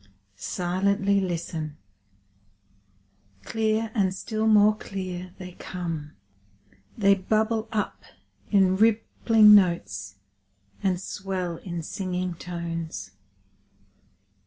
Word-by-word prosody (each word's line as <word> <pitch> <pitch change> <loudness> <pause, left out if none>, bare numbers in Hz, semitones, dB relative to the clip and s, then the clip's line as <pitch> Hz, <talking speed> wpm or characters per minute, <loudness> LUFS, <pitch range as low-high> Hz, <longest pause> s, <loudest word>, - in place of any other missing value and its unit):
Silently 195 - 0
listen! 165 -4 -4 1.7
Clear, 220 0 0
and 190 -4 +1
still 220 +3 -2
more 215 0 +6
clear, 185 -3 -6
they 180 -1 -8
come. 165 -5 -6 0.8
They 200 -2 +5
bubble 220 +3 0
up 215 -3 -2 0.5
in 190 -2 +4
rippling 220 0 +5
notes, 100 - +2 0.7
and 185 -2 +1
swell 185 -3 -4
in 170 -3 -6
singing 180 +1 -3
tones. 165 - -5
185 Hz, 85 wpm, -26 LUFS, 170-210 Hz, 1.7 s, more